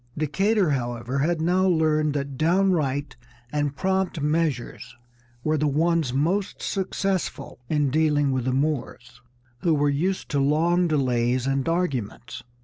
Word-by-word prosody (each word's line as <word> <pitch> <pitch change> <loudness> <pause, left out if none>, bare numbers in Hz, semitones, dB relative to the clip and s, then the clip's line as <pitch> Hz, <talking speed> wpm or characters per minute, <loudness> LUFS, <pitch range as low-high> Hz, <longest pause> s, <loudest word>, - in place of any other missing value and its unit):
Decatur, 190 +4 +1
however, 120 0 -2
had 165 +4 +1
now 185 +3 +2
learned 155 -3 +2
that 140 -1 -3
downright 155 -4 +1 0.4
and 145 -1 -1
prompt 190 0 -1
measures 150 -4 -2 0.5
were 155 0 +1
the 150 - +1
ones 160 -1 +1
most 170 +9 -1
successful 190 -8 -3
in 145 -3 +1
dealing 150 -2 +2
with 130 -2 -1
the 130 - +1
Moors, 130 -3 -3 0.4
who 165 +1 +2
were 145 0 +2
used 180 +7 -1
to 145 - 0
long 165 +5 +2
delays 125 -4 +1
and 135 +2 0
arguments. 140 - -3
150 Hz, 135 wpm, -24 LUFS, 135-170 Hz, 0.5 s, now